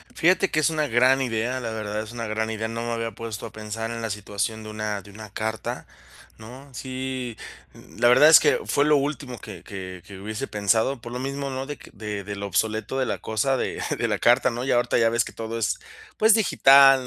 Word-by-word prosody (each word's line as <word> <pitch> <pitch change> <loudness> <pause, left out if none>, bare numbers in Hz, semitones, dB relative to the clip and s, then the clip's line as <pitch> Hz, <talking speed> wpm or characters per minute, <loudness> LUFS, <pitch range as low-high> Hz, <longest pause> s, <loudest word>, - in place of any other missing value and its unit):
Fíjate 185 +3 +3
que 155 - +1
es 155 - +3
una 155 -2 0
gran 125 +3 +4
idea, 120 +1 -1
la 115 -3 -4
verdad, 110 -1 -3
es 110 +1 -8
una 115 -1 -4
gran 110 +1 -1
idea. 110 0 -3
No 115 +1 -4
me 120 - -3
había 115 0 -2
puesto 115 -2 -6
a - - -8
pensar, 110 +1 -5
en 115 0 -5
la 115 - -3
situación, 105 +2 -3
de 110 - -8
una 105 -1 -3
de 100 - -15
una 110 +1 -10
carta, 110 +2 -4 0.5
¿no? 125 +6 -12
Sí, 130 -2 -4 0.4
n - - -16
la 120 - +6
verdad, 125 +5 +7
es 160 - +10
que - - +3
fue 145 - +2
lo 150 0 +5
último 140 -3 -3
que - - -10
que 95 -2 -8
que 100 -2 -11
hubiese 110 +6 -4
pensado. 110 +5 +1
Por 120 +1 -9
lo 125 - -3
mismo, 140 +1 -3
¿no?, 130 0 -4
de 145 0 -5
que - - -14
de 105 -1 -5
de 100 0 -5
lo 100 0 -4
obsoleto, 110 +6 -1
de 130 - +1
la - - -2
cosa 110 +5 0
de - - -3 0.2
de - - 0
la - - 0
carta, 120 +2 +4
¿no? 120 +1 -4
Ya 135 - +2
ahorita, 120 0 +2
ya 115 -1 +4
ves 115 0 +2
que - - -9
todo 115 0 -5
es 115 - 0 0.4
pues, 220 0 +6
digital, 135 - +6
115 Hz, 240 wpm, -24 LUFS, 110-130 Hz, 0.5 s, es